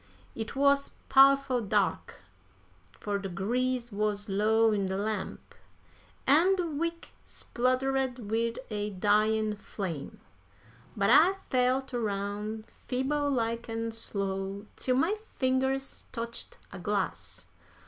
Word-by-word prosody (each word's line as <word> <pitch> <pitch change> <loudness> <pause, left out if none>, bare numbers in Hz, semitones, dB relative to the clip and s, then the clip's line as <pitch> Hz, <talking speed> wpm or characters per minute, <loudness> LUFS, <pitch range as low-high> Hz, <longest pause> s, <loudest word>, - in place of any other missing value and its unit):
It 225 +2 -5
wuz 280 0 +3 0.2
powerful 275 -2 +5
dark, 205 - -1 0.7
fur 205 -1 -3
de 195 -1 -5
grease 240 +6 -1
wuz 205 0 -1
low 220 +3 +3
in 200 -2 0
de 190 0 -2
lamp, 210 -1 -4 0.7
an' 335 +8 +5
de 360 -2 -1
wick 335 +2 -3 0.2
spluttered 255 +1 0
wid 230 +1 0
a 210 0 -2
dyin' 210 +2 +2
flame. 180 -8 -6 0.8
But 200 -1 +3
I 370 +4 +7 0.2
felt 260 +1 +1
aroun', 210 -1 -3 0.2
feeble 285 +3 0
like 230 -3 -1
an' 225 0 -2
slow, 195 -2 -3
till 255 - +1
my 325 +10 +2 0.2
fingers 265 +1 0
touched 235 -1 -5 0.2
a 195 - -7
glass. 95 - -3
225 Hz, 115 wpm, -29 LUFS, 205-265 Hz, 0.8 s, I